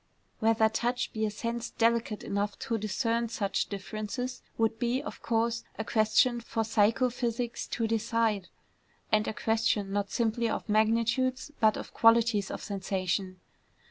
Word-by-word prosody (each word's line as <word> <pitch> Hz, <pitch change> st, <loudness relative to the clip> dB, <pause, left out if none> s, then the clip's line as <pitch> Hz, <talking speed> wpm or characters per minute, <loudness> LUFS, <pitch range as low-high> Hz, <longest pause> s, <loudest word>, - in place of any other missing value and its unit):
Whether 220 Hz, 0 st, +4 dB
touch 240 Hz, +3 st, -1 dB
be 220 Hz, -1 st, 0 dB
a -, -, -1 dB
sense 230 Hz, +3 st, -4 dB
delicate 230 Hz, -2 st, +1 dB
enough 200 Hz, +1 st, -2 dB
to 230 Hz, -1 st, -2 dB
discern 230 Hz, +2 st, 0 dB
such 200 Hz, -4 st, -1 dB
differences, 215 Hz, +5 st, -5 dB, 0.2 s
would 225 Hz, 0 st, +1 dB
be, 240 Hz, +2 st, +1 dB
of 295 Hz, -, -8 dB
course, 230 Hz, 0 st, 0 dB
a 220 Hz, -, -3 dB
question 230 Hz, +3 st, +3 dB
for 230 Hz, -1 st, -2 dB
psycho 225 Hz, +3 st, +2 dB
physics 240 Hz, 0 st, -2 dB
to 230 Hz, -, -1 dB
decide, 225 Hz, -2 st, 0 dB, 0.6 s
and 215 Hz, 0 st, +3 dB
a -, -, -1 dB
question 220 Hz, -3 st, +1 dB
not 200 Hz, -1 st, 0 dB
simply 230 Hz, 0 st, 0 dB
of -, -, -3 dB
magnitudes, 230 Hz, +5 st, +1 dB
but 220 Hz, -3 st, +4 dB
of -, -, -8 dB
qualities 225 Hz, -3 st, +4 dB
of -, -, -6 dB
sensation. 190 Hz, -1 st, -2 dB
225 Hz, 145 wpm, -29 LUFS, 215-235 Hz, 0.6 s, Whether